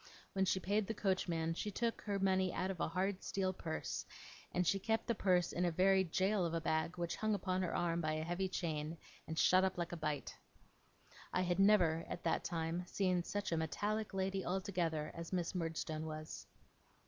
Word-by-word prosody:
When 190 -1 +2
she 190 - +2
paid 200 +2 +1
the 225 - -2
coachman 175 -5 0
she 210 +5 -3
took 230 +3 -1
her 205 -1 -1
money 190 -1 +2
out 190 - -1
of 185 - -7
a - - +1
hard 185 +3 -1
steel 190 -1 0
purse, 160 -3 -3 0.5
and 180 0 +1
she 195 +4 +3
kept 225 +3 0
the 235 - +1
purse 180 -4 +2
in 180 - 0
a 175 - +3
very 190 +3 +4
jail 190 +3 +1
of 170 -1 0
a - - +1
bag 160 +2 0
which 170 -1 -1
hung 215 -1 +1
upon 185 -2 -1
her 180 - -1
arm 170 -1 +1
by 155 -1 0
a 155 0 -1
heavy 175 +3 -1
chain, 160 -2 -2 0.3
and 160 - -4
shut 185 +3 +5
up 190 -1 +1
like 170 -1 -2
a - - -3
bite. 150 -2 -2 1.0
I 185 - +1
had 180 0 +1
never, 180 -5 +5
at - - -5
that 165 -1 +1
time, 165 +1 -2
seen 185 -2 +1
such 205 +2 -3
a 165 - +2
metallic 210 +7 -1
lady 190 0 -1
altogether 175 -5 -1
as 170 -1 -7
Miss 175 -2 0
Murdstone 160 -2 -2
was. 155 0 -6
180 Hz, 205 wpm, -37 LUFS, 165-195 Hz, 1.0 s, shut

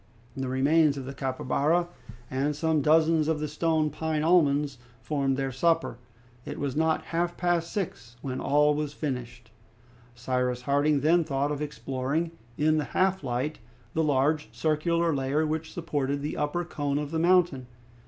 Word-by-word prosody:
The 130 -1 -3
remains 140 +3 +3
of 135 - -5
the 135 - -6
capybara 140 +6 0 0.4
and 140 +3 0
some 160 0 +1
dozens 155 +1 +4
of 160 -1 0
the 150 - -2
stone 155 0 0
pine 155 0 -2
almonds 145 -5 +3 0.2
formed 135 0 -1
their 135 -1 -1
supper. 165 -2 +1 0.4
It - - -6
was 140 -2 -3
not 160 +1 +1
half 175 +1 0
past 175 -1 0
six 125 - -4
when 130 -1 -3
all 150 +1 +3
was 150 -1 -3
finished. 120 -6 -5 0.6
Cyrus 125 0 -1
Harding 145 +1 +2
then 165 +4 +4
thought 140 -1 -1
of 150 0 -3
exploring 140 +3 -2 0.3
in 155 +1 +3
the 150 - -1
half 190 -2 +2
light 130 +4 -2 0.3
the 160 - +1
large 150 +1 +1
circular 165 +2 +1
layer 140 +3 0
which 155 +1 -3
supported 145 -4 -2
the 150 - -3
upper 150 +4 -1
cone 145 -3 -2
of 145 0 -3
the 160 - -1
mountain. 170 -7 +3
150 Hz, 160 wpm, -27 LUFS, 135-160 Hz, 0.6 s, dozens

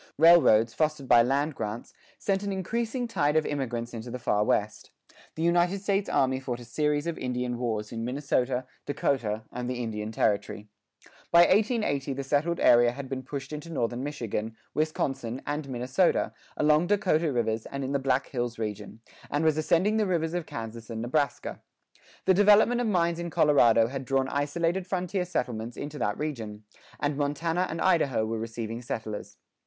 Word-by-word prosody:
Railroads, 150 -9 +6
fostered 150 -3 -1
by 120 -1 +7
land 140 +5 +1
grants, 105 -2 -5 0.2
sent 195 -1 0
an 200 -1 -3
increasing 230 +6 -2
tide 150 -9 +1
of 155 -1 +3
immigrants 120 -4 -3
into 115 +1 -6
the 125 - -4
Far 105 -4 +1
West. 105 0 -1 0.5
The 160 - -3
United 175 +3 +2
States 200 0 0
Army 130 0 +2
fought 125 -2 -4
a 120 - -10
series 150 +4 0
of 170 -1 -3
Indian 125 -1 -2
wars 110 -4 -2
in 115 -1 -4
Minnesota, 130 0 -1 0.2
Dakota, 125 -6 -1
and 125 0 -4
the 125 - -2
Indian 110 -3 -4
Territory. 105 -1 -1 0.6
By 170 - +8
1880 195 - +2
the 135 +1 -4
settled 150 +5 0
area 120 0 +5
had 135 0 -7
been 130 -1 -3
pushed 140 +2 -6
into 150 +2 -6
northern 120 -4 -2
Michigan, 115 -6 -4 0.2
Wisconsin, 135 -5 -1
and 145 -1 -3
Minnesota, 130 +8 +1 0.2
along 150 +3 +3
Dakota 170 -6 +2
rivers, 115 -3 -1
and 140 0 -5
in 135 - -3
the 140 - +1
Black 135 0 +1
Hills 120 -2 -3
region, 110 0 -5 0.3
and 145 +3 0
was 155 -2 +4
ascending 170 +7 +2
the 215 -2 +2
rivers 165 -3 0
of 175 -2 -3
Kansas 115 0 -7
and 115 -1 -4
Nebraska. 140 +4 -1 0.6
The 190 - +5
development 210 +5 +5
of 240 - 0
mines 170 -4 +1
in 170 0 -4
Colorado 120 -8 +5
had 135 +2 -5
drawn 135 +1 +1
isolated 165 +6 -1
frontier 185 0 -1
settlements 120 -8 -3
into 145 +1 -6
that 105 0 -1
region, 110 -9 -5 0.4
and 145 0 0
Montana 165 +5 0
and 165 - -4
Idaho 145 -11 +2
were 110 0 -3
receiving 115 +1 -5
settlers. 110 -3 -6
140 Hz, 170 wpm, -27 LUFS, 120-165 Hz, 0.6 s, By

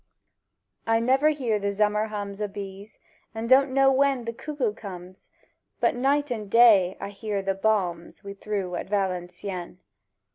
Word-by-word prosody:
I 225 0 +3
never 265 +6 +3
hear 250 -8 -1
the 200 0 -1
zummer 210 +1 +1
hums 205 -1 -6
O' 210 - 0
bees; 200 +1 -9 0.4
and 225 +1 -4
don' 265 +2 +5
know 270 0 +4
when 270 -2 +2
the 230 - -4
cuckoo 260 -4 -3
comes; 185 -3 -11 0.5
But - - +2
night 275 +3 0
and 215 -4 -4
day 205 -5 +5
I - - -5
hear 205 0 -4
the 195 0 0
bombs 190 -4 -1
We 200 0 -7
threw 200 -2 -4
at 175 - -4
Valencieën. 180 -2 -3
210 Hz, 155 wpm, -25 LUFS, 195-240 Hz, 0.5 s, don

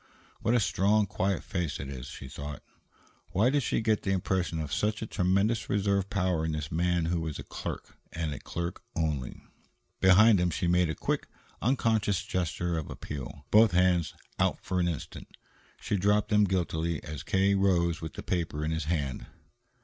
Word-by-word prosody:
"What 120 - +1
a - - +5
strong, 105 0 +2
quiet 95 0 -1
face 90 -7 -3
it 70 - -5
is," 65 -3 -7
she 65 - -8
thought. 70 +1 -7 0.7
Why 110 +8 +3
did 145 0 +2
she 115 - 0
get 110 -1 +1
the - - -3
impression 90 -3 0
of 75 -2 -4
such 110 +1 0
a - - -2
tremendous 100 +3 +1
reserve 100 -1 +1
power 90 -5 0
in 80 -1 -1
this 75 -1 -4
man 85 +1 +1
who 85 0 0
was 80 -2 -4
a - - -6
clerk, - - -6 0.2
and 80 -3 -3
a 70 - -7
clerk 85 +1 -5
only? 75 -6 -2 0.6
Behind 95 +3 +6
him 90 0 +2
she 85 +3 -2
made 90 0 +3
a 80 - -2
quick, - - -2 0.3
unconscious 110 -6 +1
gesture 85 -1 -1
of 75 - -7
appeal, 70 0 -7
both 110 -2 +6
hands 90 -2 +2 0.2
out - - +2
for 90 0 0
an 85 - +2
instant. 85 -4 -5 0.5
She 100 - -1
dropped 105 +2 +2
them 105 -1 +5
guiltily 85 -4 -1
as 75 -1 -6
K. 95 +1 +2
rose 90 -4 +2
with 80 -2 -6
the - - -7
paper 80 -4 -2
in 80 - -1
his 80 -1 -2
hand. 75 -5 -2
90 Hz, 185 wpm, -29 LUFS, 80-100 Hz, 0.7 s, Behind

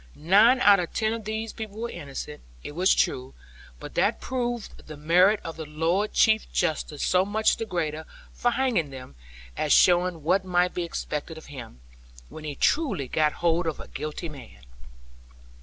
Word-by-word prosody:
Nine 210 - +5
out 200 -3 +7
of 175 - -3
ten 220 0 +1
of 225 -2 -6
these 220 +1 -4
people 215 -2 -8
were 235 +1 -3
innocent, 145 +1 -7 0.2
it - - -6
was 180 +5 +3
true; 130 0 -1 0.4
but - - -9
that - - +1
proved 240 -3 -4
the 155 -1 -9
merit 180 +7 +4
of 165 - -7
the 160 - -6
Lord 165 +7 0
Chief 220 0 +3
Justice 150 -1 -1
so 185 0 +3
much 215 +2 +1
the 225 - -4
greater 160 -4 -3 0.3
for 245 - +1
hanging 240 - 0
them, 130 - -10 0.4
as - - -1
showing 175 -2 +4
what 185 +5 +2
might 180 -1 +1
be 180 - -3
expected 160 -1 -5
of 160 - -11
him, 115 - -10 0.5
when 155 - -10
he 145 -2 -5
truly 200 - +1
got 150 +3 +1
hold 170 0 +2
of 160 - -3
a - - -9
guilty 155 +4 -5
man. 125 - -12
175 Hz, 175 wpm, -26 LUFS, 150-215 Hz, 0.5 s, out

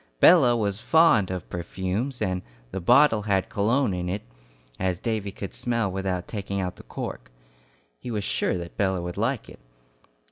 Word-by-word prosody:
Bella 120 -1 +7
was 100 -1 -1
fond 160 - +4
of 90 -3 -4
perfumes, 95 +9 -3
and 90 -1 -1 0.3
the 95 - -4
bottle 120 +2 +5
had 100 -2 0
cologne 115 +2 +1
in 90 0 -3
it, 100 +3 -3 0.6
as 95 -2 0
Davy 105 -1 -2
could 95 0 -7
smell 115 -5 -1
without 95 -1 -2
taking 100 -2 -4
out 90 -1 -3
the - - -10
cork. - - -7 0.7
He - - -7
was 105 -3 -2
sure 95 - 0
that 85 -1 -8
Bella 95 -3 +1
would 90 0 -5
like 115 +3 -1
it. - - -13
100 Hz, 170 wpm, -25 LUFS, 90-115 Hz, 0.7 s, Bella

